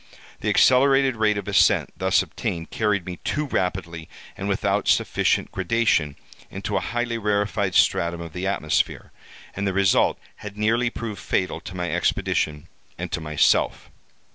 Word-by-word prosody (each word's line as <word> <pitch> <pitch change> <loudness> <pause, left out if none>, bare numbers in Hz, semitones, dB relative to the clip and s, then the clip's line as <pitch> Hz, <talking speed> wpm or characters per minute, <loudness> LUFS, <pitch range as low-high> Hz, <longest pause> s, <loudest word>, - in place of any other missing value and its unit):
The - - -2
accelerated 135 0 +4
rate 110 -1 +1
of 100 -1 -5
ascent 100 - +3
thus - - +2
obtained, 85 -1 -5
carried 105 -4 0
me 90 -1 -6
too 150 - -2
rapidly, 85 - -3 0.3
and - - -4
without - - 0
sufficient - - +1
gradation, 95 -7 +1 0.3
into - - -4
a - - +3
highly 120 -1 -2
rarefied 100 -2 0
stratum 85 0 +2
of 85 -2 -8
the 90 +2 -3
atmosphere, 80 -6 -1 0.4
and 100 +1 -2
the 95 - -1
result 95 0 +3 0.2
had 105 -1 -9
nearly 115 +3 +1
proved 115 -3 -6
fatal 90 - -1
to 90 - -9
my 90 -1 -3
expedition 75 -1 -1 0.3
and - - -5
to 85 - -2
myself. 75 -2 +1
100 Hz, 150 wpm, -23 LUFS, 85-115 Hz, 0.4 s, accelerated